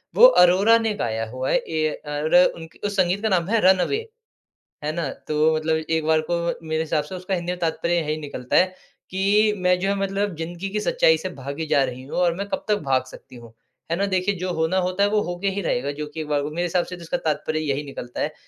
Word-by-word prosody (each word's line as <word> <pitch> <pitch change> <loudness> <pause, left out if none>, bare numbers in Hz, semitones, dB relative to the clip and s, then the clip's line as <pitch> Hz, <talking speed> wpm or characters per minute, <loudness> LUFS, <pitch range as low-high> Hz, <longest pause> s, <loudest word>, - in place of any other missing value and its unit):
वो - - +9 0.2
अरोरा 195 +6 +6
ने 225 -2 0
गाया 115 - -2
हुआ 130 +2 -3
है - - +4
ए 160 -9 -1 0.3
अर 150 +2 -2 0.2
उनकी 165 -1 -12
उस 205 - -5
संगीत 185 +2 +2
का 220 - 0
नाम 175 -3 +1
है, 230 0 +3
रन 190 +1 +6
अवे 415 - +1 0.9
है 150 - 0
ना? 165 -4 -2
तो 155 +1 0
मतलब 160 0 0
एक 160 0 -1
बार 160 0 +4
को 170 - +2 0.3
मेरे 160 0 0
हिसाब 155 -2 -1
से 185 - -9
उसका 185 +1 -3
हिंदी 175 0 -2
में 180 - -6
तात्पर्य 170 +1 0
यही 155 -2 -1
निकलता 130 -4 -3
है 185 - +6 0.4
कि 205 +3 +3
मैं 180 0 +2
जो 195 - 0
है, 200 - +2
मतलब 195 -1 -1
जिंदगी 170 +4 -5
की 210 +1 -2
सच्चाई 160 -5 +3
से 185 - -4
भागी 140 +4 -5
जा 145 -2 +3
रही 130 0 -5
हूँ 140 - -7
और 175 -2 +3
मैं 200 +1 -3
कब - - -3
तक 210 - +3
भाग 130 -1 +2
सकती 130 -1 -13
हूँ। 115 -1 -13 0.4
है 170 - +1
ना, 200 +2 +1
देखिए 190 +1 0
जो 185 0 -2
होना 160 +3 +1
होता 190 +2 +1
है - - +3
वो 210 0 +2
होके 175 +2 -3
ही 200 - -1
रहेगा। 140 -1 -1
जो 150 +1 -5
कि 160 +2 -8
एक 155 - -5
बार 145 -1 +1
को 145 - -4
मेरे 175 +3 -2
हिसाब 175 +1 +1
से 180 - -7
तो 175 - -12
उसका 165 - -2
तात्पर्य 155 0 -1
यही 145 -1 -2
निकलता 125 -3 -7
है, - - -1
170 Hz, 255 wpm, -23 LUFS, 150-190 Hz, 0.9 s, वो